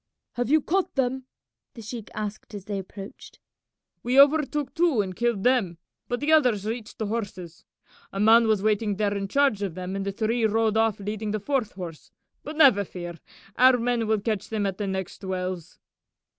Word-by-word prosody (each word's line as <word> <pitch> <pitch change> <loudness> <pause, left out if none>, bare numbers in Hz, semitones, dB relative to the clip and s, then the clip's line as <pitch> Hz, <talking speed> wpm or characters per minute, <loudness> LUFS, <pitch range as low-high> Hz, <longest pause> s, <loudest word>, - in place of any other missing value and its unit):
"Have 245 0 -2
you 310 +1 +4
caught 380 +2 0
them?" 265 0 -1 0.5
the 230 - -9
sheik 220 0 -7
asked 210 0 -6
as 200 -2 -8
they 200 -1 -3
approached. 195 +1 -10 0.6
"We 250 +3 +2
overtook 295 0 +4
two 330 -8 +2
and 190 -3 -1
killed 235 -3 0
them, 240 -10 +2 0.3
but 245 - -2
the 295 +2 +1
others 245 -10 +3
reached 225 0 -5
the 220 - -2
horses. 195 -6 -5 0.5
A 195 - -5
man 225 +2 +6
was 215 -3 +2
waiting 210 -1 +1
there 205 0 0
in 195 0 -2
charge 275 -3 +2
of 190 -5 -3
them, 185 +1 -5
and 195 - -2
the 200 - -2
three 225 +3 -1
rode 220 0 +1
off 225 -2 +2
leading 210 +1 -4
the 215 +1 -1
fourth 250 0 -1
horse; 175 -4 -8 0.3
but 305 - -8
never 260 -10 +6
fear, 175 -3 -8 0.4
our 255 0 +6
men 235 -1 0
will 220 -1 +2
catch 210 -1 -3
them 215 -2 -1
at 195 0 -3
the 205 - -2
next 190 0 -5
wells." 185 -2 -4
215 Hz, 190 wpm, -25 LUFS, 195-245 Hz, 0.6 s, man